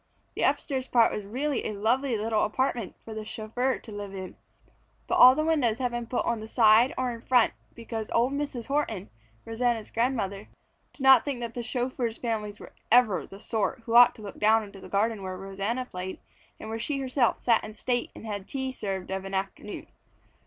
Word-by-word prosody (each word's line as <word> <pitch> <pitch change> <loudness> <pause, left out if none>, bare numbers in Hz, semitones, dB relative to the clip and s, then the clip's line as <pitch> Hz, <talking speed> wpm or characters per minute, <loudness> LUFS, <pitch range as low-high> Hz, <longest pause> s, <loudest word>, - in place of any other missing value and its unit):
The - - -4
upstairs 270 -2 0
part 230 -2 +4
was 210 - -4
a - - -12
really 270 +5 -1
lovely 230 +5 +1
little 215 0 0
apartment 235 -2 -1
for 225 - -7
the 215 0 -5
chauffeur 230 +4 -2
to 225 - -12
live 205 -1 -6
in, 190 -1 -7 0.7
but - - 0
all 255 +1 +10
the 310 - 0
windows 275 -9 +2
had 250 -2 -1
been 240 -1 -4
put 245 - -1
on 235 -1 0
the 215 - -7
side 225 +2 +5
or 255 -1 0
in 230 -1 -8
front 245 -1 +3 0.2
because 225 -2 -5
old 245 +4 +2
Mrs. 280 -5 -3
Horton, 250 -9 -2 0.3
Rosanna's 225 -1 -1
grandmother, 220 -5 -1 0.4
did 275 - -10
not 265 -3 +8
think 280 -4 -3
that 235 0 -4
chauffeurs' 245 -1 -2
families 210 -3 -3
were - - -12 0.2
ever 235 -5 +4
the 195 - -12
sort 220 +2 -2
who 230 - -3
ought 240 +1 +8
to 215 - -12
look 200 - -8
down 220 +1 +4
into 200 -1 -11
the - - -11
garden 215 +1 0
where 185 -1 -5
Rosanna 195 +6 -3
played 185 -4 -6 0.4
and - - -8
where 225 +1 -4
she 275 +5 -2
herself 260 -2 +1
sat 230 -2 +2
in 215 0 -8
state 245 +2 -1
and - - -10
had 205 -3 -5
tea 265 -1 -3
served 195 -7 -4
of 190 0 -2
an 195 0 -5
afternoon. 195 +2 -4
230 Hz, 200 wpm, -27 LUFS, 210-250 Hz, 0.7 s, all